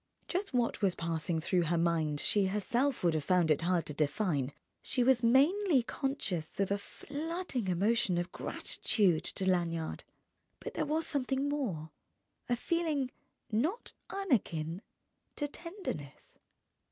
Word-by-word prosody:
Just 385 +3 -2
what 240 -4 0
was 195 -3 +2
passing 165 0 -1
through 175 +1 +1
her 170 +2 +1
mind 165 -3 +1
she 200 +3 +3
herself 235 +7 0
would 170 -2 +4
have 155 -2 0
found 175 0 +3
it 150 - +3
hard 175 0 +1
to 150 - -4
define; 145 -2 0 0.3
she 250 - 0
was 255 -1 +4
mainly 280 - +4
conscious 225 - -3
of 195 0 +1
a 200 - +1
flooding 290 - -4
emotion 190 +1 +2
of 175 +1 -2
gratitude 185 -8 +1
to 190 - -1
Lanyard; 170 -3 0 0.6
but - - -6
there - - -1
was 315 +2 0
something 270 0 0
more, 205 - -2 0.6
a 245 - +3
feeling 300 -2 0 0.4
not 310 - 0 0.2
unakin 190 - 0 0.5
to 290 - -1
tenderness.... 335 - -7
205 Hz, 140 wpm, -32 LUFS, 170-280 Hz, 0.6 s, would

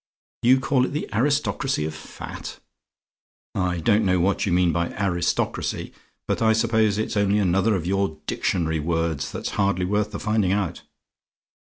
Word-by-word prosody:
"YOU 130 +2 +5
CALL 130 -1 +2
IT - - -5
THE 150 - -2
ARISTOCRACY 135 - +1
OF 80 - -4
FAT? 80 0 -8 0.9
"I 90 -2 0
don't 105 +6 +3
know 90 -2 +2
what 95 +3 +1
you - - 0
mean 90 0 +3
by 85 +1 0
'aristocracy'; 90 -3 -1 0.3
but - - -1
I 110 -1 +4
suppose 110 -2 +2
it's 110 - -2
only 100 0 +2
another 100 +2 +2
of 85 -3 -3
your 95 -3 0
dictionary 80 -3 0
words, 80 -2 -1
that's - - -4
hardly 100 -2 +1
worth 105 +2 0
the - - -6
finding 105 -3 +1
out. 100 -5 -2
100 Hz, 160 wpm, -24 LUFS, 85-110 Hz, 0.9 s, YOU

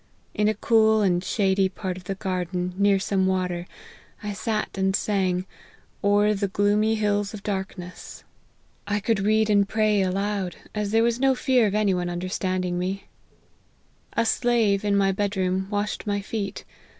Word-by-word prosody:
In 210 0 +1
a 215 - +1
cool 220 -1 +3
and 180 -3 +2
shady 195 -2 +1
part 185 -1 -4
of 185 0 -11
the 195 - -3
gar 185 -2 -2
den, 180 +1 -3
near 200 0 +3
some 190 -1 0
water, 180 -2 -1 0.6
I 210 0 -3
sat 215 +1 -2
and 190 0 +1
sang 185 -4 0 0.3
' - - -32
O'er 205 +1 +4
the 200 0 -1
gloomy 205 +3 +2
hills 205 -1 0
of 200 - -10
darkness.' 190 -3 -6 0.6
I 205 0 0
could 220 0 0
read 215 +2 +2
and 200 -2 +3
pray 215 -1 +2
60 - - +2
LIFE - - 0
OF - - -2
HENRY 200 +1 0
MARTYN. 205 -1 -1 0.2
aloud, - - -20
as 210 -1 -2
there 225 +2 +3
was 235 0 +1
no 270 0 +3
fear 250 -3 +3
of 200 - -2
any 210 -2 +2
one 180 -1 -1
understand 185 +1 -2
ing 175 0 -2
me. 190 +2 -3 0.5
" - - -38 0.3
A 230 - +1
slave, 225 -4 +2
in 205 -1 +1
my 195 -1 +3
bed 200 +1 -2
room, 185 0 0
washed 205 +1 -2
my 205 0 0
feet. 200 -1 -5
200 Hz, 200 wpm, -25 LUFS, 190-210 Hz, 0.6 s, O'er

